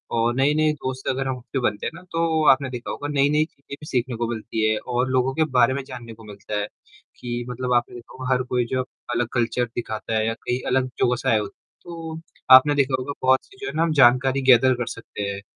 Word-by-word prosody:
और 115 Hz, +1 st, +2 dB
नए-नए 150 Hz, +3 st, +3 dB
दोस्त 130 Hz, -2 st, -6 dB
अगर 135 Hz, 0 st, -1 dB
हम 130 Hz, -1 st, -2 dB
उससे 125 Hz, +2 st, -5 dB
बनते 105 Hz, -4 st, -1 dB
हैं -, -, -2 dB
ना 170 Hz, -, -11 dB
तो 165 Hz, -1 st, +1 dB
आपने 135 Hz, 0 st, +1 dB
देखा 125 Hz, -2 st, -5 dB
नई-नई 145 Hz, +1 st, +2 dB
चीज़ें 140 Hz, -3 st, -12 dB
भी -, -, -9 dB
सीखने 125 Hz, -2 st, -1 dB
को 120 Hz, 0 st, -1 dB
मिलती 110 Hz, -1 st, -1 dB
है 110 Hz, -, +1 dB
और 125 Hz, +1 st, -1 dB
लोगों 130 Hz, +1 st, +1 dB
के 160 Hz, -, +3 dB
बारे 125 Hz, +1 st, +5 dB
में 140 Hz, +1 st, -3 dB
जानने 125 Hz, -4 st, -9 dB
को 110 Hz, 0 st, -15 dB
मिलता 105 Hz, 0 st, -5 dB
है 105 Hz, -, -2 dB, 0.5 s
कि 120 Hz, 0 st, -4 dB
मतलब 125 Hz, 0 st, -2 dB
आपने 120 Hz, 0 st, +1 dB
देखा 120 Hz, -1 st, -12 dB
होगा 130 Hz, 0 st, -4 dB
हर 125 Hz, 0 st, +1 dB
कोई 125 Hz, -1 st, -1 dB
जो 130 Hz, 0 st, +1 dB, 0.3 s
अलग 120 Hz, -1 st, 0 dB
कल्चर 120 Hz, 0 st, 0 dB
दिखाता 110 Hz, -1 st, -4 dB
है 110 Hz, -, +1 dB
या 115 Hz, -, 0 dB
कहीं 125 Hz, +2 st, -3 dB
अलग 130 Hz, 0 st, +1 dB
जगह 125 Hz, -, +3 dB
से -, -, 0 dB
आया 110 Hz, -, +4 dB
होता 105 Hz, -, -6 dB
है। -, -, -67 dB
तो 165 Hz, -2 st, -7 dB, 0.4 s
आपने 145 Hz, +3 st, +6 dB
देखा 135 Hz, -2 st, +2 dB
होगा 135 Hz, +3 st, -4 dB
बहुत 130 Hz, 0 st, +3 dB
सी 395 Hz, -, -20 dB
जो 405 Hz, -, -4 dB
है -, -, -4 dB
ना 160 Hz, -, +2 dB
हम 165 Hz, -1 st, +1 dB
जानकारी 130 Hz, +2 st, +4 dB
गैदर 130 Hz, +2 st, +6 dB
कर 120 Hz, 0 st, -3 dB
सकते 115 Hz, -2 st, -7 dB
हैं। 100 Hz, 0 st, -5 dB
130 Hz, 245 wpm, -23 LUFS, 120-140 Hz, 0.5 s, आपने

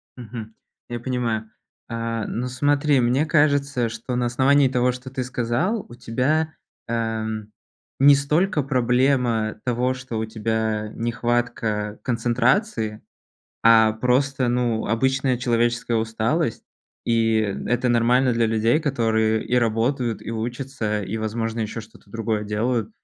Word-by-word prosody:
Мгм. 115 Hz, -2 st, -8 dB, 0.3 s
Я 120 Hz, 0 st, -4 dB
понимаю. 115 Hz, -3 st, -2 dB, 0.4 s
Э, 115 Hz, -1 st, -3 dB
ну 125 Hz, +2 st, -3 dB
смотри, 145 Hz, +2 st, +2 dB
мне 125 Hz, +5 st, +2 dB
кажется, 145 Hz, -5 st, +2 dB
что 125 Hz, +2 st, -5 dB
на 125 Hz, 0 st, 0 dB
основании 135 Hz, +3 st, +3 dB
того, 125 Hz, 0 st, +2 dB
что 125 Hz, +1 st, -8 dB
ты 130 Hz, -1 st, -3 dB
сказал, 125 Hz, -, -1 dB
у 120 Hz, -, -10 dB
тебя, 135 Hz, +7 st, 0 dB, 0.3 s
э, 115 Hz, -, -3 dB
м, 110 Hz, -2 st, -3 dB, 0.5 s
не 140 Hz, +1 st, +8 dB
столько 150 Hz, +4 st, +1 dB
проблема 125 Hz, -4 st, +1 dB
того, 125 Hz, +1 st, 0 dB
что 130 Hz, -3 st, -6 dB
у 110 Hz, -, -1 dB
тебя 110 Hz, -1 st, -2 dB
нехватка 115 Hz, -3 st, -1 dB
концентрации, 120 Hz, -, 0 dB, 0.6 s
а 110 Hz, -1 st, +6 dB
просто, 125 Hz, +2 st, +1 dB
ну, 120 Hz, -2 st, 0 dB
обычная 130 Hz, +2 st, +1 dB
человеческая 120 Hz, -1 st, +1 dB
усталость, 115 Hz, +5 st, -1 dB, 0.4 s
и 115 Hz, -1 st, +2 dB, 0.3 s
это 120 Hz, +2 st, +1 dB
нормально 120 Hz, +2 st, +3 dB
для 115 Hz, 0 st, +2 dB
людей, 115 Hz, +5 st, +2 dB
которые 110 Hz, -6 st, +1 dB
и 125 Hz, -, 0 dB
работают, 120 Hz, +1 st, 0 dB
и -, -, -6 dB
учатся, 115 Hz, -2 st, -3 dB
и, 100 Hz, +3 st, -4 dB
возможно, 115 Hz, +1 st, -3 dB
еще 110 Hz, +1 st, -3 dB
что-то 110 Hz, -1 st, -18 dB
другое 110 Hz, 0 st, -2 dB
делают. 110 Hz, +1 st, -1 dB
120 Hz, 130 wpm, -23 LUFS, 110-130 Hz, 0.6 s, не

